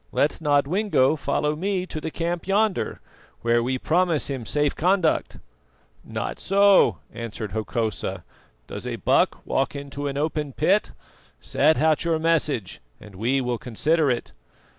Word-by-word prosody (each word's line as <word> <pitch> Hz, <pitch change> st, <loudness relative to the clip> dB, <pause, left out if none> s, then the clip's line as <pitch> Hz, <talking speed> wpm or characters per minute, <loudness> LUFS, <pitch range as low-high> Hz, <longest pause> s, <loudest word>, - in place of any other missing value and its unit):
Let 150 Hz, +3 st, 0 dB
Nodwengo 150 Hz, +1 st, +2 dB
follow 150 Hz, 0 st, -1 dB
me 185 Hz, +2 st, -1 dB
to 155 Hz, -4 st, -6 dB
the 160 Hz, -, -3 dB
camp 170 Hz, +2 st, -3 dB
yonder, 205 Hz, 0 st, +1 dB, 0.4 s
where 120 Hz, 0 st, +2 dB
we 130 Hz, +2 st, -1 dB
promise 165 Hz, 0 st, +1 dB
him 125 Hz, -5 st, -5 dB
safe 145 Hz, +5 st, +1 dB
conduct." 180 Hz, -1 st, +1 dB, 0.7 s
"Not -, -, -5 dB
so," 200 Hz, 0 st, +4 dB, 0.2 s
answered 110 Hz, -3 st, -6 dB
Hokosa. 110 Hz, -4 st, -3 dB, 0.4 s
"'Does -, -, -7 dB
a -, -, -3 dB
buck -, -, +1 dB
walk 135 Hz, +1 st, -1 dB
into 140 Hz, 0 st, -5 dB
an 140 Hz, 0 st, -3 dB
open 150 Hz, -1 st, -2 dB
pit?' -, -, +2 dB, 0.5 s
Set 155 Hz, +3 st, +2 dB
out 155 Hz, +1 st, +3 dB
your 165 Hz, -1 st, +1 dB
message, 155 Hz, -, 0 dB, 0.2 s
and 105 Hz, -1 st, -13 dB
we 120 Hz, +8 st, 0 dB
will 125 Hz, -2 st, -2 dB
consider 150 Hz, +6 st, +1 dB
it." 120 Hz, -2 st, -2 dB
150 Hz, 140 wpm, -24 LUFS, 125-165 Hz, 0.7 s, so